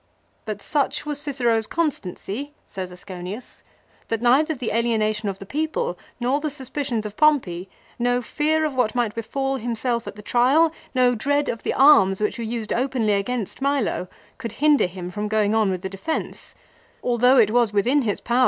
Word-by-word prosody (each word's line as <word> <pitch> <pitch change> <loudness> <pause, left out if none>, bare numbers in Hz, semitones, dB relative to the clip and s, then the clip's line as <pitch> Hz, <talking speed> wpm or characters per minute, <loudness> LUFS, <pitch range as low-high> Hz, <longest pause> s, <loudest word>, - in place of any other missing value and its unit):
" - - -41
But 210 -1 -4
such 290 0 0
was 295 -1 -2
Cicero's 240 -6 +1
constancy," 285 - -3
says 185 -2 -6
Asconius, 180 +5 -8 0.5
"that 225 - -1
neither 270 +7 +3
the 245 -3 -3
alienation 215 -2 +1
of 195 - -4
the 195 - -9
people, 315 - -2 0.2
nor 255 +4 +1
the 305 +1 -2
suspicions 265 -4 -3
of 210 -1 -6
Pompey, 200 - +2 0.3
no 245 +1 +2
fear 310 +5 0
of 300 - -2
what 250 -2 +1
might 235 -4 +1
befall 270 +4 -2
himself 235 0 -2
at - - -6
the 210 - -11
trial, 275 +9 +3 0.2
no 250 -1 +4
dread 285 +5 0
of 230 - -3
the - - -2
arms 195 -9 +6
which 210 +2 -1
were - - -2
used 225 -1 -3
openly 245 -4 +1
against 215 +3 -2
Milo, 275 -9 0 0.3
could 230 -4 -5
hinder 295 -2 +4
him 180 0 -7
from 210 +2 -3
going 215 -1 +1
on 220 -2 +3
with 185 -1 -3
the - - -1
defence, 195 +12 -4 0.5
although 250 +2 +4
it 215 -4 +5
was 240 -2 +3
within 240 +8 +2
his 210 -5 -1
power 240 +1 -1
HILO. - - +4
240 Hz, 185 wpm, -23 LUFS, 210-275 Hz, 0.5 s, arms